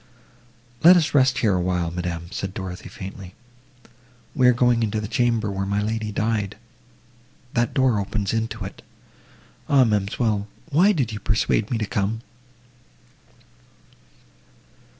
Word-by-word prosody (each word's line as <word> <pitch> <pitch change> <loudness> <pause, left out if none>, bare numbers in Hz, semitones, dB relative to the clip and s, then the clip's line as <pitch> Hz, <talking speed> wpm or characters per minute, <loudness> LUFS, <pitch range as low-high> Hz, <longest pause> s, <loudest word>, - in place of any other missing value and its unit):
"Let 180 +2 +9
us 155 -3 +1
rest 130 -2 +4
here 105 - +4
awhile, 90 -2 0
madam," 85 -1 -4
said 95 -2 -5
Dorothée 95 0 -6
faintly, 95 -1 -9 1.0
"we 130 -3 +4
are - - +8
going 120 -1 +2
into 110 -1 0
the 105 - -4
chamber, 115 -2 +1
where 95 0 -3
my 100 +1 0
lady 110 0 -2
died! 105 -1 -1 1.0
that 120 +3 0
door 130 -6 +3
opens 100 +1 -2
into 115 -2 -2
it. 95 - -9 0.9
Ah, 140 -2 +6
ma'amselle! 105 -1 0 0.2
why 180 +8 +5
did 135 - -1
you 105 - -5
persuade 110 -1 0
me 120 - 0
to 110 - -1
come?" 105 +1 -2
110 Hz, 130 wpm, -23 LUFS, 100-120 Hz, 1.0 s, Let